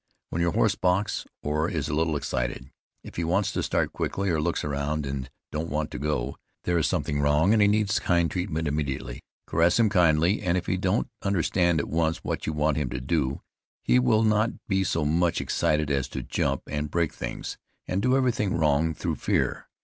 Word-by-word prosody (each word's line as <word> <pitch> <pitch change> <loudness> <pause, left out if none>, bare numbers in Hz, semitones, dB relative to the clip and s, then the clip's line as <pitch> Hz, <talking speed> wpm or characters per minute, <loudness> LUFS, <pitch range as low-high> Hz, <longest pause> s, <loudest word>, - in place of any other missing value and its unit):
When 85 - -1
your 85 -1 +1
horse - - +3
balks, 95 +3 0 0.2
or 75 +3 0
is 75 -4 -2
a - - -3
little 80 0 +1
excited, 65 -2 -3 0.3
if - - -11
he 85 - 0
wants 95 +4 +1
to - - -1
start - - 0
quickly, 100 -1 -1
or 80 -2 +1
looks - - -1
around 75 +1 -2
and 65 -1 -4 0.2
don't 80 +2 -3
want 75 0 -2
to - - -5
go, 70 -2 -2 0.3
there 85 -1 +1
is 80 - +2
something 70 0 -1
wrong, 75 +7 +4
and 110 - +4
needs 105 0 +2
kind 85 -1 +2
he 80 - -2
treatment 80 -3 -2
immediately. 70 -4 -3 0.2
Caress 85 +2 +3
him 115 -2 +5
kindly, 85 0 +3
and 90 -2 +1
if 90 - -2
he - - 0
don't 95 +4 0
understand 90 -3 +2
at - - -2
once 80 0 0
what - - -3
you 80 - 0
want 75 0 +1
him 75 -4 -1
to 65 - -3
do 70 0 -1 0.4
he - - +4
will 110 - +3
not 110 +1 +3 0.2
be 95 -2 +2
so 80 -4 0
much 85 +3 +2
excited 75 -1 0
as 70 -2 0
to - - -5
jump - - -1
and 75 0 -3
break 80 0 0
things, - - -5 0.3
and 95 +2 0
do 125 +4 +3
everything 115 -8 +1
wrong 80 0 +2
through - - -2
fear. - - 0
80 Hz, 205 wpm, -26 LUFS, 75-90 Hz, 0.4 s, him